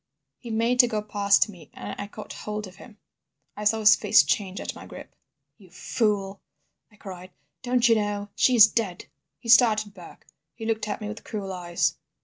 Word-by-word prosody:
"He 235 - -10
made 230 +3 0
to 245 - +7
go 215 -3 -3
past 200 -1 +2
me, 175 -8 -14
and - - -7
I 205 - -6
caught 210 0 -10
hold 210 0 -6
of 185 -1 -14
him. 220 -4 -15 0.6
"I 210 - -6
saw 220 +1 +2
his 215 0 +7
face 215 - +4
change 195 -2 -2
at - - -5
my - - -12
grip. - - -12 0.5
"'You 190 -3 -18
fool,' 200 +1 -2 0.5
I - - -21
cried. 185 -3 -10 0.3
'Don't 250 -1 +2
you 230 - +5
know? 205 -1 -2
She 255 - +3
is 220 -3 +10
dead!' 220 -5 -3 0.3
"He 240 - -14
started 215 -3 +4
back. - - -14 0.3
He 225 - -8
looked 220 -1 -2
at 215 - -4
me 210 - -5
with 215 +1 -8
cruel 200 -3 -6
eyes. 175 -1 -1
210 Hz, 195 wpm, -25 LUFS, 200-225 Hz, 0.6 s, is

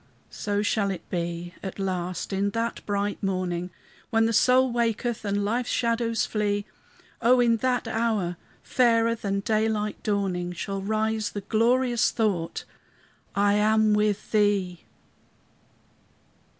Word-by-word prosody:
So 205 0 -2
shall 205 -1 +1
it 185 -4 -5
be 175 0 -3
at 190 - -6
last, 185 -1 -3
in 200 +1 +1
that 230 +1 -2
bright 205 0 -1
morning 185 -2 -2 0.4
When 225 0 +3
the 230 - +1
soul 255 +3 +4
waketh 235 0 -1
and 200 0 -1
life's 240 +4 -1
shadows 230 -1 0
flee; 205 -1 -1 0.6
O 245 +2 +5
in 235 -1 +4
that 250 0 0
hour, 220 -6 0 0.3
fairer 230 -2 +3
than 200 -3 -2
daylight 215 -1 0
dawning, 185 -4 -1
Shall 195 +3 -4
rise 220 +1 -1
the 205 - -4
glorious 240 +3 +2
thought, 195 -7 -1 0.7
I 200 0 +3
am 215 +1 +3
with 210 -1 0
Thee! 200 -5 +1
210 Hz, 125 wpm, -26 LUFS, 195-230 Hz, 0.7 s, O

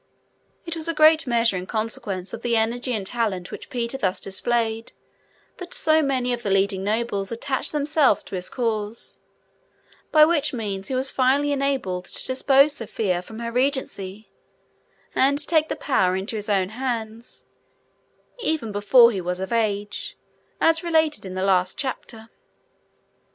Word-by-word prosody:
It 335 -1 -4
was 325 0 +1
in 330 - 0
a - - -17
great 310 -1 +5
measure 230 -3 +2
in 180 0 -4
consequence 205 -4 -3
of - - -6
the 235 -1 +1
energy 240 +3 0
and 210 -5 -2
talent 200 -5 -2
which - - -8
Peter 240 +2 -2
thus 190 -6 0
displayed 225 +3 -2 0.6
that 360 -1 -6
so 315 0 +3
many 260 -4 0
of 240 - -4
the 210 - -3
leading 195 0 +1
nobles 210 -1 -1
attached 260 +3 0
themselves 295 -5 +2
to - - -13
his 185 -1 -3
cause, 225 -3 -3 0.9
by 305 -1 +7
which 300 -3 +1
means 200 -4 -4
he 265 - -2
was 260 +1 +2
finally 275 +3 +2
enabled 265 -11 -1
to - - -7
depose 275 +2 +4
Sophia 210 -7 -2
from 220 +4 -11
her 235 0 -4
regency, 235 -6 -2 0.8
and 275 +2 +3
take 315 -2 +2
the - - -2
power 185 -9 +1
into 195 +4 -3
his 210 0 -5
own 190 -2 +1
hands, 230 -1 -4 0.9
even 315 - -1
before 235 +4 +6
he 195 -4 -3
was 180 +1 -3
of 190 +4 -4
age, 205 -2 -2 0.4
as 325 +1 +3
related 315 - +1
in 185 - -7
the 185 - -2
last 185 -1 +2
chapter. 230 -4 -5
230 Hz, 160 wpm, -23 LUFS, 200-275 Hz, 0.9 s, by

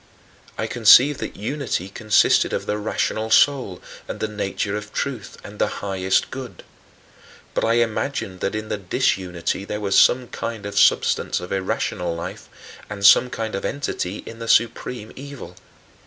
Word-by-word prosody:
I - - -1
conceived 125 +5 +6
that - - -5
unity 115 - -3
consisted 105 +2 +2
of - - -2
the 105 0 -2
rational 110 +1 -2
soul 125 -9 +3 0.2
and - - -6
the 110 - -1
nature 105 -1 -3
of 105 0 -6
truth 120 -8 -4
and 105 +1 -11
the - - +3 0.2
highest 95 -1 0
good. 125 -8 -8 0.9
But - - -1
I 115 - +2
imagined 115 -4 -1
that 100 - -2
in 110 0 -4
the 105 - -2
disunity 90 -1 -1
there 105 +1 -4
was 100 -2 -1
some 125 0 +5
kind 115 -3 -5
of 100 - -1
substance - - +3
of 90 0 -8
irrational 95 -2 -2
life 85 - -7 0.4
and 100 -2 -3
some 125 +5 +7
kind 110 -2 -4
of 100 - -3
entity 105 -9 -3
in 115 - -10
the 115 - -6
supreme 115 0 +1
evil. 135 -10 -9
105 Hz, 160 wpm, -22 LUFS, 95-120 Hz, 0.9 s, some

